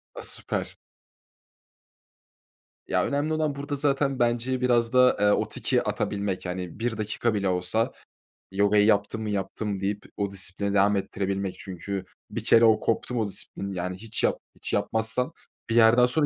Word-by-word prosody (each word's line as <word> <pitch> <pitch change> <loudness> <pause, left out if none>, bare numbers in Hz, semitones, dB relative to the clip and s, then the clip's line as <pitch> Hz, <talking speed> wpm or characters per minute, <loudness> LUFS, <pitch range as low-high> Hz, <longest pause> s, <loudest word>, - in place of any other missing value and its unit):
A, - - -6
süper. - - -4 2.1
Ya, - - +2
önemli 145 +2 0
olan 155 -2 0
burada 145 +1 -4
zaten 140 -1 +1
bence 120 +2 +1
biraz 120 -1 +2
da, 125 -2 +5
eee, 105 - +3
o - - +2
tiki - - 0
atabilmek. 100 -2 -2
Hani, 90 +2 -5
1 115 -1 -1
dakika 110 +2 -1
bile 100 -2 0
olsa 90 +5 0 0.6
yogayı 100 +1 +4
yaptım 105 +1 +2
mı, 110 - -3
yaptım 100 0 -2
deyip 100 +1 -2
o 100 -1 -1
disiplini 100 +1 -2
devam 100 +1 +4
ettirebilmek. 95 0 -2
Çünkü 95 0 -5 0.3
bir - - -4
kere 115 0 +6
o 110 -1 +5
koptu 125 +2 -1
mu 115 - +1
o 105 - 0
disiplin 100 0 -4
yani 90 0 -3
hiç 110 +3 -4
yap - - +2 0.2
hiç - - -6
yapmazsan 110 +3 0 0.4
bir 115 - 0
yerden 120 +1 +7
sonra 145 +5 +2
105 Hz, 160 wpm, -26 LUFS, 100-120 Hz, 2.1 s, yerden